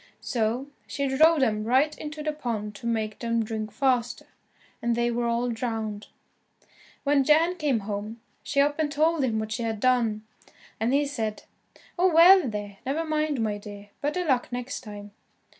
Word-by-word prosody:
So 235 +2 -1 0.2
she 280 -1 -2
drove 310 +3 +4
them 215 -4 +1
right 265 +7 +2
into 300 0 -7
the 305 - 0
pond 225 -8 -4
to 235 - -6
make 220 -2 -2
them 230 -1 0
drink 215 -1 -4
faster, 245 +1 0 0.6
and 235 0 +1
they 240 0 +1
were 235 0 -1
all 235 +1 0
drowned. 220 -3 -4 1.0
When 280 -1 +3
Jan 320 +5 +4
came 290 -9 0
home, 210 +2 -5 0.2
she 280 - +1
up 290 +2 +1
and 300 -2 0
told 310 +1 +2
him 230 -4 0
what 220 0 -3
she 230 +2 -2
had 225 -2 -2
done, 230 -3 +2 0.6
and 225 +3 +1
he 285 +2 +3
said, 225 -7 -3 0.6
"Oh, 370 +1 +4
well, 340 -2 +7
there, 205 -2 -6
never 300 +5 -1
mind, 305 -4 0
my 210 -2 -1
dear, 205 0 -10
better 325 +5 -1
luck 260 -5 +1
next 245 +2 -4
time." 205 -3 -9
245 Hz, 175 wpm, -26 LUFS, 220-290 Hz, 1.0 s, well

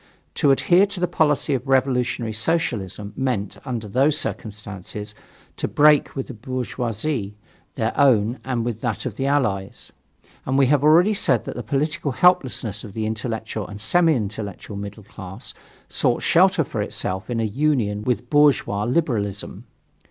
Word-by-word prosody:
To 145 - +2
adhere 175 +8 +4
to 200 -2 -5
the 180 - +1
policy 150 -4 +1
of 130 0 -2
Revolutionary 125 -4 +1
Socialism 105 - -1
meant, 125 -6 -2
under 120 -5 -4
those 135 +8 +2
circumstances, 105 - -5 0.4
to - - -2
break 150 0 +4
with 135 - -3
the - - -8
bourgeoisie, 120 -1 -3 0.4
their 115 -2 -1
own 120 -4 +3
and 125 -3 -2
that 115 -1 -3
of - - -4
the 135 - -2
Allies. 105 -9 -1 0.5
And 130 +1 0
we 135 - +5
have 140 +1 +2
already 170 +7 +5
said 130 - +2
that - - -6
the 120 - -4
political 145 - -1
helplessness 125 - +2
of 105 -4 -9
the 110 0 -2
intellectual 110 -1 -4
and 105 -1 -9
semi 165 +8 +3
intellectual 105 -2 -5
middle 100 +1 -7
class 95 +4 -9 0.3
sought - - 0
shelter - - +4
for - - -4
itself 95 +4 -3
in 120 -2 -1
a - - +1
union 110 -3 0
with 120 +1 -1
bourgeois 140 -8 +3
liberalism. 115 - -2
120 Hz, 150 wpm, -22 LUFS, 105-140 Hz, 0.5 s, we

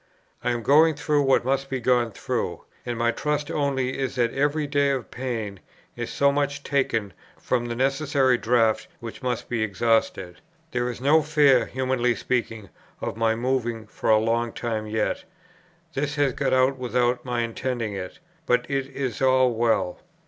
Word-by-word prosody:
I 125 - +1
am 120 -1 -1
going 155 +4 +5
through 150 0 +1
what 135 -3 +3
must 135 +1 0
be 130 -1 -2
gone 120 -1 +2
through; - - -3 0.2
and 120 -1 -2
my 120 0 +2
trust 145 +3 -2
only 135 -3 -1
is 135 0 -2
that 120 -2 +1
every 145 +2 +1
day 140 -1 +2
of 135 -3 -2
pain 115 -6 -4 0.4
is 120 -1 -4
so 140 0 +3
much 140 0 -1
taken 115 -8 0 0.3
from 120 -1 -1
the 120 - -3
necessary 135 0 +2
draught 115 -2 +2
which 115 +2 -8
must 125 -2 -2
be 115 -2 -2
exhausted. 110 -4 0 0.3
There 125 0 -1
is 120 0 -7
no 150 +4 +5
fear 145 -5 +4
(humanly 130 -2 0
speaking) 115 -5 -2 0.3
of - - -4
my 115 0 +1
moving 120 -2 -1
for 105 - -4
a 110 - +7
long 115 +2 0
time 110 -2 -3
yet. 110 +10 -1 0.7
This 145 +1 -2
has 145 -3 +2
got - - -1
out 130 +1 +3
without 125 0 0
my 120 -2 -1
intending 115 -1 -3
it; 95 -2 -6 0.3
but 125 0 +2
it 135 -1 -1
is 135 -4 -4
all 130 -1 +4
well. 110 -6 0
125 Hz, 170 wpm, -25 LUFS, 115-135 Hz, 0.7 s, a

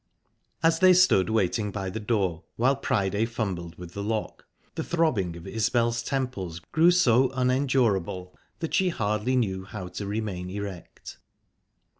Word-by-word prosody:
As 165 0 +4
they 185 -1 +7
stood 175 - +4
waiting 110 0 +1
by 95 -2 -4
the 110 - -4
door, 100 -7 0
while 130 +4 +3
Priday 100 -5 0
fumbled 95 -8 -4
with 90 -1 -10
the 100 - -4
lock, 110 +1 -3 0.3
the - - -3
throbbing 120 - 0
of 85 - -11
Isbel's 115 +1 0
temples 115 - -3
grew 165 +2 +5
so 130 -8 +4
unendurable 125 -9 +1 0.3
that 165 - -3
she 190 -1 +3
hardly 105 - 0
knew 95 -7 0
how 95 -2 -7
to 100 +3 -6
remain 100 -4 -3
erect. 100 -3 -8
110 Hz, 145 wpm, -26 LUFS, 95-130 Hz, 0.3 s, they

